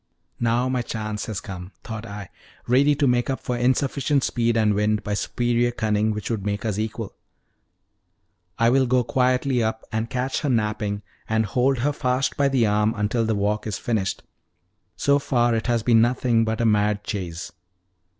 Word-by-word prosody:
"Now 120 +2 +1
my 130 -1 0
chance 110 -2 -4
has 110 -4 -3
come," 95 -1 -8
thought 110 0 -6
I, 100 -3 -8 0.4
ready 140 +4 +4
to 145 0 +1
make 125 -1 +2
up 135 - -1
for 125 - -3
insufficient 135 +3 +1
speed 115 -1 +1
and 105 -2 +3
wind 105 0 +1
by 105 - -2
superior 120 +3 0
cunning, 110 -2 0
which 105 +1 -3
would 110 -4 -2
make 100 +1 -2
us 105 -2 -1
equal. 110 0 -4 1.4
"I 115 +1 +4
will 130 0 +3
go 125 0 +3
quietly 125 0 +1
up 110 0 -2
and 110 +1 -2
catch 130 +1 -1
her 150 - -1
napping, 105 -3 -1 0.3
and 110 0 +2
hold 130 +5 +1
her 145 - +2
fast 130 -1 0
by 140 - +2
the 130 -4 +2
arm 105 +1 +2
until 110 +2 0
the 110 - +1
walk 105 +2 -1
is 100 -3 -2
finished. 105 -5 -2 0.7
So 140 0 +2
far 120 -4 +1
it 115 0 -1
has 120 -2 +1
been 115 -2 +5
nothing 120 -1 +2
but 110 +1 -1
a - - +2
mad 105 -1 +2
chase." 90 -6 -5
115 Hz, 180 wpm, -23 LUFS, 105-125 Hz, 1.4 s, been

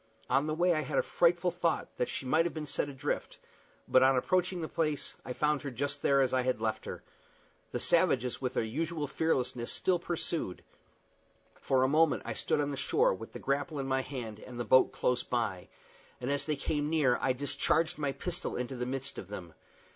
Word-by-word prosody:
On 135 +3 +3
the 155 - -1
way 175 +2 +3
I 155 - +1
had 135 - -3
a - - +4
frightful 175 +1 +2
thought 170 -1 -1
that 125 - 0
she - - -4
might 155 +6 +3
have 170 - -7
been 155 -1 -4
sent 145 - -1
adrift; 135 -2 -3 0.5
but, 130 - +5
on 130 +1 +5
approaching 180 +6 +1
the 160 - -2
place, 155 -3 -1
I - - -6
found 150 +1 +1
her 140 - -4
there 125 - -12
just 145 +1 -2
as 135 -2 +3
I 130 - +3
had 125 -2 0
left 110 -1 -2
her. - - -6 0.7
The - - -2
savages, 125 +1 +2
with 130 0 -2
their - - +2
usual 155 +7 -2
fearlessness, 130 -5 0
still 180 -2 +1
pursued. 165 - -2 0.9
For 130 -1 +1
a - - +4
moment 155 +2 +3
I - - -3
stood - - 0
on 145 0 0
the 140 - -3
shore, 470 - +2
with - - -9
the - - -5
grapple 145 +3 -1
in 135 - -2
my 130 0 +1
hand 120 -6 -6
and 120 +1 -9
the 120 - -2
boat 130 - +5
close 125 0 +1
by, 110 -7 -2 0.5
and 125 +2 -2
as 140 +2 -1
they 155 - +1
came 145 +1 -1
near 145 -6 +3
I - - +2
discharged 155 +5 +1
my 145 -2 0
pistol 180 +5 -4
into 125 +2 -3
the 125 0 -3
midst 135 +1 -4
of - - -8
them. 90 -5 -8
140 Hz, 215 wpm, -31 LUFS, 125-160 Hz, 0.9 s, but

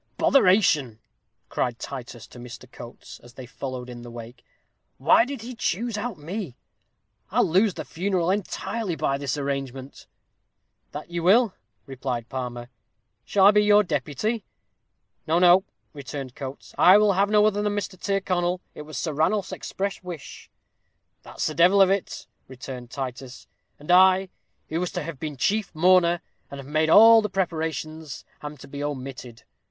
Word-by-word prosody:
"Botheration!" 180 - +3 0.5
cried 120 -2 -2
Titus 120 -4 -8
to 120 - -14
Mr. 120 +1 -10
Coates, 120 - -11
as 120 0 -17
they 130 - -9
followed 125 0 -7
in 120 -1 -9
the 120 - -10
wake, 120 +1 -11 0.5
"why 160 - +4
did 270 -4 -7
he 250 +2 -7
choose 230 0 -2
out 210 -2 -4
me? 165 - -6 0.7
I'll - - +2
lose 190 +3 +2
the - - -6
funeral 180 0 -1
entirely 200 0 -3
by 140 -3 -1
his 140 0 -2
arrangement." 135 -1 -5 0.8
"That 150 +3 -8
you 170 0 -3
will," 205 +4 +4 0.3
replied 130 -3 -5
Palmer. 125 -2 -5 0.6
"Shall 195 -2 +3
I 200 - +9
be 210 0 +4
your 210 0 +5
deputy?" 165 - -2 0.8
"No, 160 +2 +2
no," 180 +2 +5 0.3
returned 140 -2 -7
Coates. 135 0 -9
"I 185 +3 +8
will 210 -1 +4
have 200 +2 +2
no 210 0 +4
other 205 -1 +1
than 210 0 -1
Mr. 200 -2 -4
Tyrconnel. 180 -2 -1
It - - -9
was 150 -2 -8
Sir 155 - -2
Ranulph's 185 +7 0
express 200 +1 -4
wish." 175 -6 -9 0.7
"That's - - -5
the 155 - -1
devil 175 +6 +4
of 195 -1 +6
it," 195 -1 -2 0.2
returned 130 -1 -9
Titus; 130 -1 -7 0.3
"and 150 +4 -4
I, 185 +1 +5 0.4
who 160 - -2
was 180 0 -2
to 180 -4 -3
have 150 -3 -7
been 150 -2 -5
chief 205 +6 -1
mourner, 175 0 +4 0.3
and 140 - -8
have 135 - -9
made 155 +2 +1
all 225 +5 +8
the 210 - -3
preparations, 160 -4 -4 0.2
am 150 0 -7
to - - -13
be 140 +1 -6
omitted. 130 -4 -6
160 Hz, 160 wpm, -24 LUFS, 135-195 Hz, 0.8 s, I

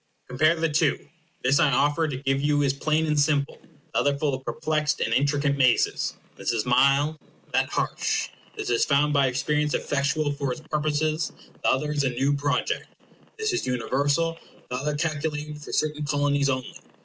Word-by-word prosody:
Compare 155 +6 +3
the 165 0 0
two. 150 -1 +1 0.4
This 135 +2 +3
I 145 - +4
offer 145 +5 +2
to 140 -4 -3
give 135 0 0
you 145 0 +2
is 135 -1 +2
plain 155 +3 0
and 150 -1 +1
simple. 145 -1 +1 0.3
The - - +2
other 145 0 +1
full 145 -1 0
of 130 0 -4
perplexed 150 +4 -1
and 115 - 0
intricate 140 +2 +2
mazes. 130 -3 +2 0.2
This - - -1
is 115 -1 -1
mild; 140 +5 +3 0.3
that - - +2
harsh. - - -1 0.3
This - - -3
is 120 - +3
found 145 +1 +2
by 140 -2 +4
experience 150 +4 0
effectual 145 +1 0
for 140 -2 -2
its 140 - -5
purposes; 155 +1 0 0.3
the - - +2
other 150 +3 +1
is 145 -1 0
a 135 - +2
new 135 +3 +1
project. 145 0 -1 0.5
This 435 -3 -1
is 365 - -1
universal; 140 +7 0 0.3
the - - -1
other 145 +3 -2
calculated 150 -1 -3
for - - -9
certain 150 0 0
Colonies 145 -1 +1
only. 130 -1 -3
145 Hz, 180 wpm, -25 LUFS, 135-150 Hz, 0.5 s, I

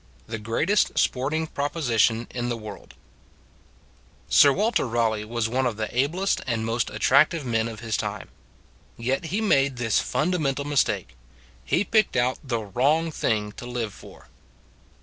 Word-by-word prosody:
THE 115 0 -5
GREATEST 150 - +1
SPORTING 150 +5 +1
PROPOSITION 125 -7 0
IN 120 -1 -3
THE 120 - -2
WORLD 105 -2 -10 1.3
SIR 140 - +7
WALTER 215 - +1
RALEIGH 110 -2 0
was 115 0 -1
one 130 +3 0
of 115 -3 -3
the 110 +1 -4
ablest 170 +10 +1
and 115 -3 -1
most 115 +1 -1
attractive 150 +3 +3
men 115 -2 0
of 115 -1 -8
his 115 -3 -2
time. - - -4 0.7
Yet 130 +7 -1
he 190 +7 -2
made 140 - +2
this 115 -3 +1
fundamental 150 -5 -1
mistake: 100 - 0 0.5
he 65 - +1
picked 215 0 +2
out 125 +1 +1
the 130 -4 -1
wrong 145 - +1
thing 105 -7 -1
to 120 - -9
live 120 -4 -3
for. - - -15
125 Hz, 150 wpm, -25 LUFS, 115-145 Hz, 1.3 s, SIR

